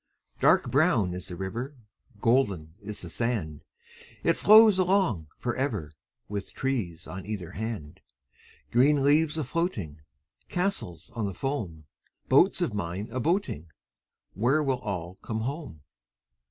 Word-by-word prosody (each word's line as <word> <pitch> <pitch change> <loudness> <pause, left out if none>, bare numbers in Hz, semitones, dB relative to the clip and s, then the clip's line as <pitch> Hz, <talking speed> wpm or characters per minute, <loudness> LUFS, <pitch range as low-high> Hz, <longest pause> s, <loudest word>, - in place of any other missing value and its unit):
Dark - - +4
brown 130 - +3
is 90 +1 -6
the 90 - -6
river, 115 - -4 0.5
Golden 100 -11 +2
is 105 -1 -6
the 85 - -6
sand. 105 -12 -2 0.6
It - - +4
flows 215 -2 +7
along 185 - +2
for 120 - -2
ever, 110 - -2 0.4
With 100 -1 -5
trees 115 -12 -2
on 95 0 -7
either 95 -6 -4
hand. 105 -8 -5 0.7
Green 135 +4 +4
leaves 150 +2 +3
a 155 - 0
floating, 115 - -2 0.5
Castles 180 - -2
of 110 -4 -2
the 95 - -5
foam, 95 - -3 0.4
Boats - - +5
of - - -1
mine 100 +2 -3
a 130 - -2
boating— 145 - 0 0.7
Where 130 - +2
will 135 -3 0
all 95 -5 -5
come 110 -1 -3
home? 135 - -5
115 Hz, 135 wpm, -28 LUFS, 90-140 Hz, 0.7 s, flows